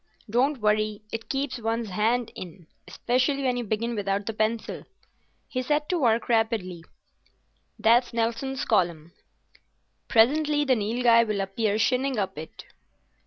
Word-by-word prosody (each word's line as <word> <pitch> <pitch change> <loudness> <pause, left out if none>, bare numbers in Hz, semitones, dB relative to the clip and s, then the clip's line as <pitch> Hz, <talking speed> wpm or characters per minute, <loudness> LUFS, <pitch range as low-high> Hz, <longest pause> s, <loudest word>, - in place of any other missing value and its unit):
"Don't 250 +4 +1
worry; 215 0 +1
it 225 0 -6
keeps 275 -2 -2
one's 225 -1 -2
hand 225 +4 0
in—specially 245 - -3
when 255 -2 +1
you 245 - -2
begin 230 +2 -2
without 200 -1 -2
the 225 - -3
pencil." 220 +1 -2 0.6
He 255 - -3
set 295 +3 -1
to 360 - +1
work 235 -4 +2
rapidly. 220 -7 0 0.9
"That's 240 +2 +3
Nelson's 235 +4 -2
Column. 170 -6 0 0.9
Presently 295 +6 +3
the 265 - +3
Nilghai 230 +2 +3
will 210 -2 -1
appear 200 +2 -1
shinning 255 +4 +1
up 190 -2 -2
it." 160 - -10
230 Hz, 130 wpm, -26 LUFS, 210-250 Hz, 0.9 s, That's